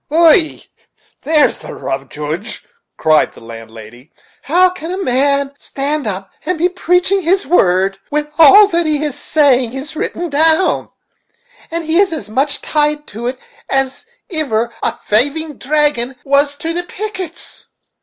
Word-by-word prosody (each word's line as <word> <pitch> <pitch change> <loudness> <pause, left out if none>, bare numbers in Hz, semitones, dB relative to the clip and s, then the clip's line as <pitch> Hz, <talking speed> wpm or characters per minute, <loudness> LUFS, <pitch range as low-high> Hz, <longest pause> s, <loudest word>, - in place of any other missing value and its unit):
"Ày! 325 +1 +4 0.6
there's 305 0 +2
the - - -9
rub, 135 0 -5
Joodge," 155 +9 -5 0.3
cried 155 -1 +2
the - - -14
landlady. 115 +3 -12 0.3
"How 360 +5 +3
can 340 -2 -8
a 370 - -3
man 280 -3 +1
stand 285 -1 -3
up 195 -1 -4
and 365 -1 -2
be 350 +3 +2
preaching 360 +2 +1
his 375 +3 +1
word, 195 - +2
when 300 0 -1
all 390 +7 +9
that 340 -2 +1
he 300 -1 +1
is 300 -3 -2
saying 260 -6 +2
is 270 +4 -6
written 340 +1 -4
down, 320 +5 +2 0.8
and 335 0 -4
he 320 +3 +2
is 395 -2 +3
as 310 -8 -5
much 275 +5 0
tied 300 -1 0
to 230 +4 -5
it 255 +1 -3 0.3
as 270 +6 -1 0.3
iver 235 -6 -1
a - - 0
thaving 285 +7 0
dragoon 290 -3 0
was 285 +1 +2
to 325 +3 -4
the 350 - -1
pickets?" 370 -2 -7
295 Hz, 150 wpm, -16 LUFS, 240-330 Hz, 0.8 s, all